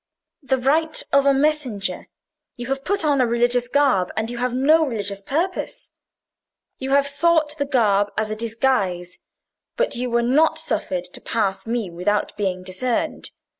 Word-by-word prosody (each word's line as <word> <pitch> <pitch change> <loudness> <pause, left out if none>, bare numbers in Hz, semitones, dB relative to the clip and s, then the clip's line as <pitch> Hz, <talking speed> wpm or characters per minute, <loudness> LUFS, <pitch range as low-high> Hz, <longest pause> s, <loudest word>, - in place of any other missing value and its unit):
"The 265 -2 0
right 310 +5 +1
of 280 0 +4
a - - +6
messenger. 270 -10 -1 0.5
You 240 - -7
have 270 0 -2
put 400 -1 0
on 285 -3 +3
a 250 - +3
religious 240 +1 +1
garb, 255 -9 +2
and 220 +2 -1
you 240 - -6
have 250 0 0
no 295 +6 +4
religious 205 -7 -3
purpose. 335 - -3 0.9
You 265 - -4
have 280 +1 +4
sought 305 +1 +2
the 285 - +1
garb 205 -7 +2
as 215 0 -1
a - - -2
disguise. 215 -6 -1 0.6
But - - 0
you 250 +1 -2
were 235 0 +1
not 315 +6 +3
suffered 190 - -2
to 180 - -9
pass 205 -2 -2
me 225 -5 -2
without 190 +5 -1
being 185 -3 -2
discerned. 190 +7 -2
245 Hz, 165 wpm, -22 LUFS, 205-280 Hz, 0.9 s, a